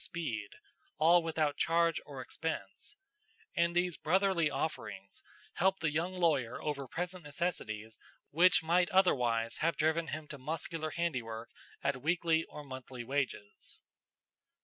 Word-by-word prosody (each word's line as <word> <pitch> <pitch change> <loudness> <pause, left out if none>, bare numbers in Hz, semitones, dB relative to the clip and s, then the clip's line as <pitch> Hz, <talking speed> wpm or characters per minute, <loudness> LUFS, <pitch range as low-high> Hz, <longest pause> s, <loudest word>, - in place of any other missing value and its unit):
Speed, 115 -12 -4 0.4
all 170 +3 +6
without 155 -3 0
charge 170 0 +2
or 140 -3 -6
expense; 160 - -5 0.6
and 170 -1 +2
these 175 -1 +1
brotherly 185 -2 +2
offerings 120 -9 -4 0.3
helped 190 0 +2
the 160 -2 +1
young 170 +5 -1
lawyer 155 -10 +1
over 140 -3 -3
present 180 +3 -4
necessities 115 -9 -3 0.3
which 170 +2 +5
might 175 +2 +3
otherwise 120 -11 +3
have 165 +1 +1
driven 160 +2 +2
him 155 0 -5
to 145 - -7
muscular 155 +3 -3
handiwork 125 -10 -3 0.3
at 140 -2 0
weekly 165 +1 +2
or 150 - -9
monthly 130 -2 -7
wages. 125 -6 -3
155 Hz, 125 wpm, -33 LUFS, 130-170 Hz, 0.6 s, all